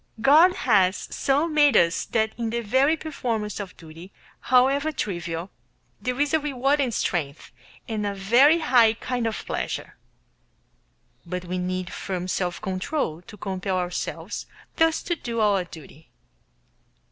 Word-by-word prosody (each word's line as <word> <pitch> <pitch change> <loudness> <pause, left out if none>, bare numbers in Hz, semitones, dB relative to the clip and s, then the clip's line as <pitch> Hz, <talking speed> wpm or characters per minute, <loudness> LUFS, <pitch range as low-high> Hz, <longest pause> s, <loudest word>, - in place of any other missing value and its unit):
God 315 +10 +6
has 195 -5 +3 0.2
so 285 +4 +1
made 295 -6 +4
us 170 0 +2
that 220 -1 0
in 230 -1 -3
the 235 +1 -2
very 265 +8 +2
performance 230 -10 -3
of 195 -3 -7
duty, 165 +3 -12 0.3
however 270 +4 +3
trivial, 175 - -4 0.5
there 250 +1 -2
is 290 +1 +1
a 315 - +4
reward 280 0 0
and 255 -3 0
strength 155 -9 -2 0.4
and 220 -2 -3
a 200 -1 -2
very 240 +11 +5
high 235 -6 +5
kind 245 0 -3
of 220 - -4
pleasure. - - -4 1.3
But 180 +1 -5
we 180 +1 -3
need 185 0 -3
firm 185 -2 -4
self 180 -1 -2
control 185 - -3
to 210 +4 -13
compel 190 -1 -3
ourselves 180 -1 -4 0.3
thus 325 0 +2
to 345 - -1
do 235 -7 -4
our 200 -4 +2
duty. 160 -1 -14
220 Hz, 145 wpm, -24 LUFS, 185-270 Hz, 1.3 s, God